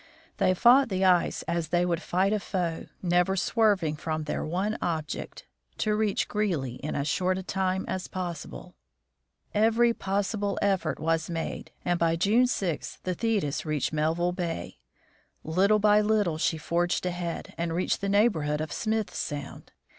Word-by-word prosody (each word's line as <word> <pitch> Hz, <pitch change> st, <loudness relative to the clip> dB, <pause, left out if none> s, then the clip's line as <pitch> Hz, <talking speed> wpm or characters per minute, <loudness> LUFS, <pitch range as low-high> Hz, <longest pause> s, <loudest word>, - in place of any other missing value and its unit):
They 185 Hz, -, +3 dB
fought 250 Hz, +6 st, +6 dB
the 190 Hz, -1 st, +1 dB
ice 180 Hz, -2 st, +3 dB
as 170 Hz, -1 st, -2 dB
they 175 Hz, +3 st, +2 dB
would 170 Hz, -1 st, -1 dB
fight 190 Hz, +3 st, +1 dB
a 215 Hz, -, +1 dB
foe, 175 Hz, -5 st, -3 dB, 0.2 s
never 180 Hz, +1 st, +2 dB
swerving 195 Hz, -6 st, +2 dB
from 155 Hz, 0 st, -3 dB
their 150 Hz, -, -3 dB
one 190 Hz, +7 st, -1 dB
object 160 Hz, -4 st, -4 dB, 0.2 s
— -, -, -42 dB
to 215 Hz, -, +1 dB
reach 210 Hz, -1 st, +1 dB
Greely 165 Hz, -, -1 dB
in 150 Hz, -, -4 dB
as 140 Hz, +1 st, -1 dB
short 185 Hz, +4 st, +1 dB
a 190 Hz, -, -4 dB
time 190 Hz, 0 st, -1 dB
as 185 Hz, -1 st, -3 dB
possible. 175 Hz, -4 st, -6 dB, 0.8 s
Every 230 Hz, +2 st, +4 dB
possible 200 Hz, 0 st, -1 dB
effort 190 Hz, -7 st, 0 dB
was 165 Hz, +1 st, 0 dB
made, 165 Hz, -1 st, -4 dB, 0.2 s
and 175 Hz, -1 st, +1 dB
by 165 Hz, -1 st, +2 dB
June 215 Hz, +9 st, +3 dB
6 185 Hz, -9 st, -2 dB
the 185 Hz, -, -1 dB
Thetis 180 Hz, -8 st, -1 dB
reached 155 Hz, -1 st, -1 dB
Melville 160 Hz, +3 st, +1 dB
bay. 175 Hz, -2 st, -4 dB, 0.6 s
Little 190 Hz, +6 st, +3 dB
by 210 Hz, 0 st, +5 dB
little 210 Hz, -7 st, +1 dB
she 160 Hz, -, +1 dB
forged 175 Hz, +3 st, 0 dB
ahead, 175 Hz, -1 st, -4 dB
and 170 Hz, 0 st, -2 dB
reached 175 Hz, +3 st, 0 dB
the 200 Hz, -, -1 dB
neighborhood 170 Hz, -8 st, +2 dB
of 155 Hz, -1 st, -4 dB
Smith 220 Hz, -1 st, -1 dB
sound. 145 Hz, -1 st, -5 dB
180 Hz, 160 wpm, -27 LUFS, 165-205 Hz, 0.8 s, fought